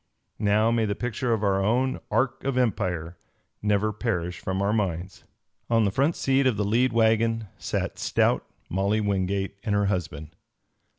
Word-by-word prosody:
Now 105 +2 +3
may 115 -1 +2
the 100 -1 -1
picture 125 +1 -2
of 110 -2 +1
our 95 -1 +2
own 130 +6 +1
Ark 130 0 0
of 135 -1 -1
Empire 90 -8 -1 0.4
never 105 +1 +1
perish 90 -6 -2
from 95 +5 -3
our 100 +1 +1
minds. 95 -4 -2 0.4
On 115 -2 +3
the 100 - +1
front 140 - +1
seat 135 0 +2
of 120 -5 +1
the 105 - 0
lead 120 +5 +2
wagon 115 -1 +2
sat - - -3
stout - - +2 0.2
Molly 100 +4 0
Wingate 100 0 -1
and 105 -3 0
her 100 0 +2
husband. 80 -5 -3
105 Hz, 165 wpm, -26 LUFS, 95-115 Hz, 0.4 s, Now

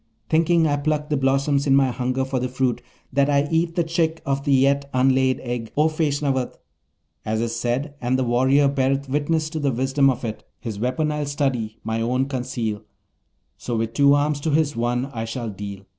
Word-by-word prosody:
thinking 165 +1 +3
I 145 -2 +1
pluck 150 +1 -1
the - - +3
blossoms 140 +1 +1
in 135 - +5
my 135 -2 +3
hunger 130 +1 -1
for 135 -1 -2
the 125 +1 -2
fruit, 130 -1 -1 0.3
that 140 +2 +3
I 140 0 +2
eat 165 +1 +1
the 175 - +2
chick 165 -1 0
of 140 0 -1
the 145 - +1
yet 140 +1 +3
unlaid 130 0 +3
egg, 120 -2 -4
O 155 +2 +4
Feshnavat. 145 -5 -1 0.7
As 110 0 -1
is 115 0 -2
said, 120 +5 -2
and 125 +1 +1
the 130 - +1
warrior 130 +4 +3
beareth 135 0 0
witness 150 +3 0
to 160 - -3
the 140 -2 +1
wisdom 135 +3 +2
of 125 -2 -2
it: 110 -1 -5 0.2
"His 110 -4 -6
weapon 140 +6 0
I'll 150 -1 -2
study; 135 -7 -1
my 110 +1 -2
own 125 +3 +1
conceal; 125 -5 -3 0.8
So 120 -2 -3
with 115 0 -2
two 140 0 +5
arms 145 0 +1
to 155 - -2
his 150 -1 +1
one 120 +2 0 0.2
shall 120 +1 -4
I - - -11
deal." 100 0 -8
135 Hz, 200 wpm, -23 LUFS, 125-145 Hz, 0.8 s, in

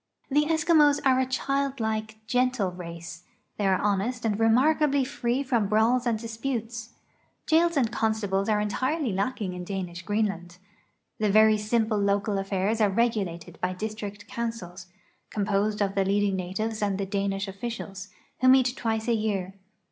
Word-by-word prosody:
The 295 +2 +3
Eskimos 315 -2 +4
are 260 -1 +4
a 260 - +1
childlike, 250 -5 -1
gentle 250 -4 +1
race. 170 -1 -8 0.4
They 205 - +1
are 190 -1 +3
honest 210 +5 -1
and 210 -1 0
remarkably 275 +5 +3
free 250 0 -1
from 235 -6 +1
brawls 230 +4 +2
and 230 -2 +1
disputes. 230 0 -5 0.5
Jails 335 0 +3
and 240 -5 +2
con 220 -2 +1
stables 195 -1 -1
are 210 -1 +3
entirely 255 +5 -1
lacking 200 -1 -2
in 180 0 -6
Danish 180 -2 -5
Greenland. 195 -3 -2 0.6
The 215 -1 +2
very 215 +1 +6
simple 215 0 +1
local 200 0 +1
affairs 195 +3 -1
are 210 - +4
regulated 195 -6 -1
by 180 0 0
district 205 0 -6
councils, 205 -7 -5 0.4
composed 205 0 0
of 195 -1 -1
the 195 -1 +2
leading 200 0 +1
natives 205 +5 -3
and 200 -2 0
the 195 - -2
Danish 195 0 -2
officials, 195 -1 -6 0.3
who 255 - +3
meet 255 -1 +5
twice 220 -1 -2
a 235 - +3
year. 200 -4 -1
215 Hz, 155 wpm, -26 LUFS, 195-240 Hz, 0.6 s, very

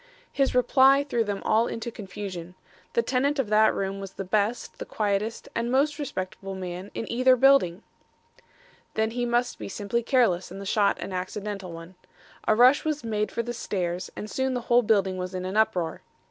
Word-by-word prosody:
"'His 275 -2 +1
reply 270 +2 +5
threw 240 -5 0
them 205 -2 -4
all 225 +2 +3
into 230 +1 -5
confusion. 190 -4 -7 0.4
The 235 - +2
tenant 270 +4 +1
of 265 -6 -1
that 215 +1 +5
room 195 0 -3
was 195 -1 -8
the 195 - -5
best, 210 +5 -1
the - - -5
quietest 210 +1 -2
and 230 +1 -1
most 285 +3 +2
respectable 195 -7 -5
man 185 +1 -6
in - - -3
either 255 +2 +5
building. 255 -8 +4 1.1
"'Then 220 0 +1
he 245 +1 -2
must 240 +1 0
be - - -6
simply 205 +4 -2
careless 230 -8 +2
and 190 +2 -8
the 200 - -7
shot 200 +1 +2
an 190 - -6
accidental 195 0 -4
one. 165 +2 -10 0.5
A 215 - +4
rush 250 +5 +6
was 305 -1 -2
made 215 -2 -1
for 235 - -2
the 240 +1 -4
stairs 180 -5 -3
and 210 - -6
soon 265 +3 -1
the 245 - -2
whole 240 +1 +4
building 200 -4 +2
was 185 0 -4
in 185 0 -3
an 190 +2 -4
uproar. 215 -7 +1
215 Hz, 190 wpm, -26 LUFS, 190-245 Hz, 1.1 s, rush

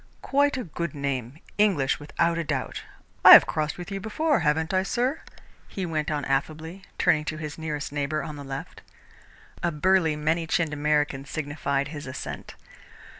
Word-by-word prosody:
"Quite 285 0 +2
a 255 - -3
good 170 -1 -5
name 135 -2 -3 0.2
English, 180 -11 +2
without 170 +3 0
a - - -1
doubt. 140 -4 -3 0.4
I - - +12
have - - +10
crossed 150 -1 -2
with 180 +2 -8
you 195 - -3
before, 285 +9 0
haven't 160 +2 0
I, 185 - +3
sir?" 250 +9 -1 0.5
he 190 - -4
went 155 -2 -2
on 150 -2 -2
affably, 155 +6 -2 0.2
turning 150 - +3
to 155 - -3
his 155 -1 -6
nearest 150 -2 -4
neighbour 145 +1 -2
on 150 - -6
the 145 - -8
left. 135 0 -7 0.8
A 175 - 0
burly, 165 0 +2
many 160 +2 0
chinned 160 -2 0
American 150 -2 0
signified 140 -1 -2
his 145 -3 -7
assent. 130 - -7
155 Hz, 170 wpm, -26 LUFS, 145-175 Hz, 0.8 s, I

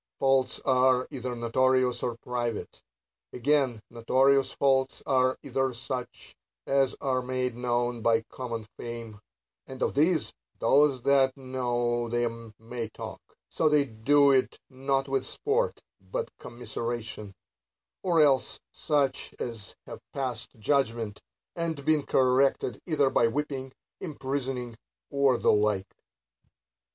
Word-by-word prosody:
Faults 135 -1 +2
are 130 -1 +3
either 130 -3 -4
notorious, 125 +2 +2
or 120 -2 -2
private. 120 -2 -4 0.5
Again, 130 -2 +2
notorious 135 +4 +3
faults 135 -1 +1
are 130 -1 +2
either 135 -2 -1
such 125 0 -6 0.3
as 135 -1 +2
are 130 -2 0
made 125 -1 -2
known 120 -1 -1
by 115 0 +3
common 115 -2 -6
fame; 115 -3 -7 0.5
and 130 0 -5
of - - 0
these 155 +3 +2 0.2
those 140 -3 +3
that 135 -1 +3
know 120 -2 -1
them 115 -1 -2
may 115 0 -6
talk, - - -8 0.3
so 160 - +1
they 150 -1 +4
do 140 +5 +4
it 130 -1 +2
not 135 +1 0
with 135 -1 0
sport, 440 - -1 0.3
but - - -3
commiseration: 115 -3 -5 0.3
— - - -64
or 170 -4 +3
else 135 -4 +3
such 140 -3 -1
as 115 -5 -6
have - - -9
passed 125 -3 -3
judgment, 115 -3 0 0.3
and 160 -4 -3
been 155 -1 +4
corrected 130 -3 +2
either 145 -5 +2
by 115 - +4
whipping, 135 +1 -3 0.3
imprisoning, 135 -6 -4 0.4
or 140 -3 +3
the - - +3
like. 105 -2 +1
130 Hz, 120 wpm, -28 LUFS, 120-140 Hz, 0.5 s, they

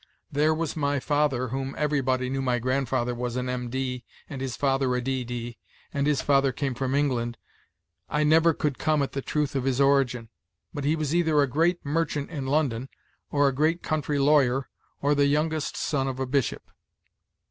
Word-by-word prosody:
There 150 +2 +2
was 160 -2 -2
my 145 -2 0
father 140 -3 0
whom 135 +2 -3
everybody 130 -4 0
knew 135 +1 -2
my 125 -2 +1
grandfather 130 0 0
was 120 0 -3
an 125 0 -2
M.D., 125 0 -3 0.2
and 135 -2 -7
his 130 -2 -3
father 135 -2 +1
a - - +1
D.D.; 120 -2 -4 0.3
and 140 0 0
his 150 -2 +1
father 135 -1 +3
came 135 +1 -2
from 130 +2 -2
England, 120 -5 0 0.7
I 150 0 +1
never 160 +1 +4
could 145 -3 -2
come 155 -2 +2
at 135 - -3
the 135 - -3
truth 150 0 -1
of 135 - 0
his 135 -1 0
origin; 135 -4 +2 0.4
but 145 -3 -4
he 150 +2 +3
was 155 -2 -2
either 160 -3 +3
a 145 - +5
great 165 +7 +1
mer 165 +4 +1
chant 145 -1 -5
in 140 -5 -4
London, 135 -4 0 0.4
or 145 -1 +3
a 135 - +1
great 155 +5 +1
country 150 -1 -1
lawyer, 135 -2 +3 0.3
or 145 +1 +3
the 145 -1 +3
youngest 155 +1 0
son 135 -3 0
of 130 -1 -4
a 130 - 0
bishop." 135 0 -1
140 Hz, 190 wpm, -26 LUFS, 130-150 Hz, 0.7 s, a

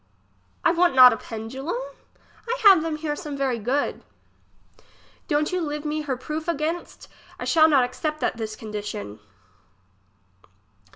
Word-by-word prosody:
I - - +6
want 350 -3 +2
not 255 -1 +9
a - - -4
pendulum? 260 - -5 0.7
I 485 +2 -2
have 390 -6 +8
them 320 -1 -2
here 305 -1 -3
some 295 -4 -6
very 265 -4 -1
good. 255 +7 -1 1.3
Don't 300 0 0
you 365 0 -1
live 300 -1 -4
me 305 +1 -2
her 275 -4 -3
proof 305 +5 -5
againts? 330 +1 -3 0.3
I - - -4
shall 320 -1 +5
not 275 -4 +4
accept 305 +5 -3
that - - -1
this 220 -1 -5
condition. 205 - -6
295 Hz, 140 wpm, -24 LUFS, 250-320 Hz, 1.3 s, not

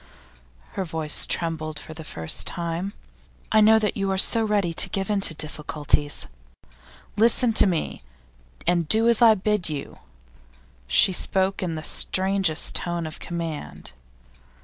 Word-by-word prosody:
Her 195 - -3
voice 160 -3 -2
trembled 155 -2 -2
for 160 - -8
the 160 0 -9
first 80 - -2
time. 170 +3 -3 0.6
'I 220 - +5
know 220 +1 +6
that 215 -2 0
you 195 -1 -1
are 190 - 0
so 225 +4 +4
ready 205 -5 0
to - - +1
give 195 +1 -2
in 205 -1 +1
to 160 - 0
difficulties. 150 -1 -2 0.9
Listen 230 +2 +3
to 215 - +6
me, 170 - -2 0.6
and 170 -2 +1
do 220 +6 +4
as 235 0 +3
I 225 -2 +7
bid 210 -3 0
you.' 145 -2 -6 0.9
She 130 - +4
spoke 190 +2 0
in 175 -3 -2
the 155 - -6
strangest 190 -3 0
tone 170 -1 -3
of 155 - -8
command. 165 - -6
175 Hz, 150 wpm, -24 LUFS, 160-205 Hz, 0.9 s, I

